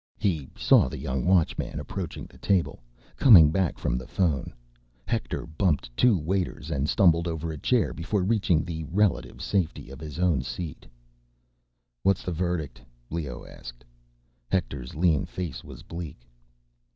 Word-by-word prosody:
He 80 -9 -1
saw - - +5
the - - -6
young 65 -2 -2
Watchman 90 -4 +1
approaching 85 +4 -5
the - - -17
table, 95 -9 0 0.4
coming 85 - +8
back 95 0 0
from - - -1
the 65 - -9
phone. 80 -7 0 0.5
Hector - - -2
bumped 80 -7 -1
two 120 - +4
waiters 85 0 -2
and 70 -1 0
stumbled 85 -4 +4
over 80 -1 -3
a 80 - -6
chair 125 - +1
before 95 +3 -1
reaching 95 -6 +2
the 80 -2 -4
relative 100 +4 0
safety 85 -9 -1
of 70 - -10
his 75 -1 -7
own 85 -7 +2
seat. 80 +4 -6 1.1
"What's 95 -1 +2
the 90 - -3
verdict?" 85 -3 -2 0.3
Leoh 75 -6 -4
asked. - - -11 0.6
Hector's 70 -9 -2
lean 80 -3 +2
face 90 -7 -5
was - - -11
bleak. 80 -7 -8
85 Hz, 145 wpm, -27 LUFS, 75-90 Hz, 1.1 s, coming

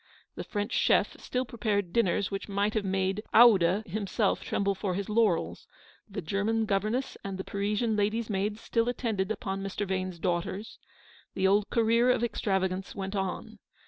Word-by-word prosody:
The - - -6
French 205 -1 -3
chef - - +3
still 255 +1 -2
prepared 210 -6 -2
dinners 200 -3 +1
which 195 +1 -4
might 200 +1 0
have 215 - 0
made 190 +1 0
Oude 205 -4 +6
himself 200 +2 -1
tremble 200 0 0
for 190 -1 -3
his 200 +1 -3
laurels; 210 -6 +1 0.4
the 195 -2 -5
German 210 +6 0
governess 215 +6 -1
and 195 -1 -4
the 190 - -4
Parisian 210 +3 -1
lady's 215 +2 0
maids 210 +1 -2
still 230 0 0
attended 220 -5 -1
upon 195 -3 -3
Mr. 195 +1 -3
Vane's 185 -1 -2
daughters; 180 +4 -3 0.6
the 190 - 0
old 200 +2 +3
career 230 +1 +3
of 250 -2 +2
extravagance 190 -4 -1
went 195 0 -4
on. 190 -2 -4
200 Hz, 160 wpm, -29 LUFS, 190-220 Hz, 0.6 s, Oude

